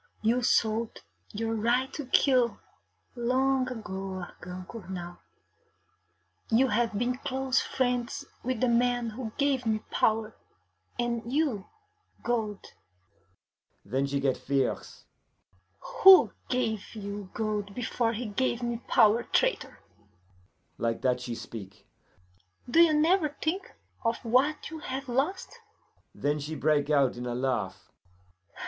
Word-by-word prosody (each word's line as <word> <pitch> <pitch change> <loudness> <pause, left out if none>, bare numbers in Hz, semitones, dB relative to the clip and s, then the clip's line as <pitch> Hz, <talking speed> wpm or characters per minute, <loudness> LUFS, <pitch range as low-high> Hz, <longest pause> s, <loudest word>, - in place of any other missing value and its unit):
You 235 +3 +3
sold 225 -1 +1 0.3
your 225 +2 -2
right 240 +4 +1
to 290 -4 -5
kill 255 -3 +3 0.6
long 255 +2 +1
ago, 190 -5 -5
Argand 180 +1 -9
Cournal. 180 -5 -7 1.3
You 250 +4 +4
have 225 -1 +1
been 250 +3 -1
close 265 0 0
friends 255 +2 -1 0.2
with 255 -2 -2
the 255 - +3
man 240 -1 +2
who 225 0 -6
gave 280 -3 +1
me 220 -2 0
power, 220 0 +1 0.6
and 235 -1 -2
you 270 -9 0 0.6
gold.' 220 -4 -2 1.1
Then 135 +7 0
she 140 0 -1
get 135 -2 +1
fierce. 135 -1 -2 0.8
'Who 380 -1 +7 0.2
gave 225 -4 -1
you 200 -2 -6
gold 210 -2 -2
before 235 -1 0
he 240 +3 -4
gave 240 +3 -1
me 240 -1 -1
power, 220 +2 +5
traitor?' - - 0 1.0
Like 115 -1 -1
that 125 -1 +2
she 120 -1 -4
speak. 100 -5 -9 0.8
'Do 285 +7 +3
you 335 -2 +6
never 320 +1 +3
think 340 +5 -2 0.3
of 230 0 +1
what 270 +8 +2
you 320 - -6
have 270 -2 -5
lost?' 305 - -2 0.6
Then 145 +1 0
she 150 +2 -5
break 150 -1 +1
out 140 -4 +3
in 125 0 -5
a 120 - -2
laugh. 130 0 -2
230 Hz, 125 wpm, -28 LUFS, 190-255 Hz, 1.3 s, Who